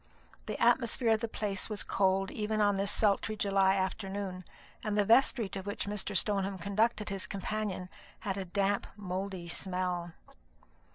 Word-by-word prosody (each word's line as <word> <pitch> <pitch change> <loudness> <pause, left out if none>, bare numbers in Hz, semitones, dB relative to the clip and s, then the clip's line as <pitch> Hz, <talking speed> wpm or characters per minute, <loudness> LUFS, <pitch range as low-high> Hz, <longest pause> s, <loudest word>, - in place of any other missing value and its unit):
The - - -4
atmosphere 235 0 +3
of 220 - +4
the 230 - -2
place 205 -3 -3
was 210 -1 -2
cold 195 0 +1
even 215 0 -1
on 205 -1 +3
this 195 +1 +1
sultry 210 +1 +2
July 195 -2 +3
afternoon, 190 -1 -3 0.4
and 210 -1 -1
the 205 - +4
vestry 230 0 +4
to 195 - -4
which 205 +2 -4
Mr. 205 -1 -1
Stoneham 195 0 +1
conducted 210 +4 +1
his 195 -1 -1
companion 200 -1 -3 0.3
had 195 -2 -2
a 195 -1 -3
damp 200 +2 0
mouldy 190 -2 -4
smell. 180 -1 -2
200 Hz, 155 wpm, -31 LUFS, 190-210 Hz, 0.4 s, of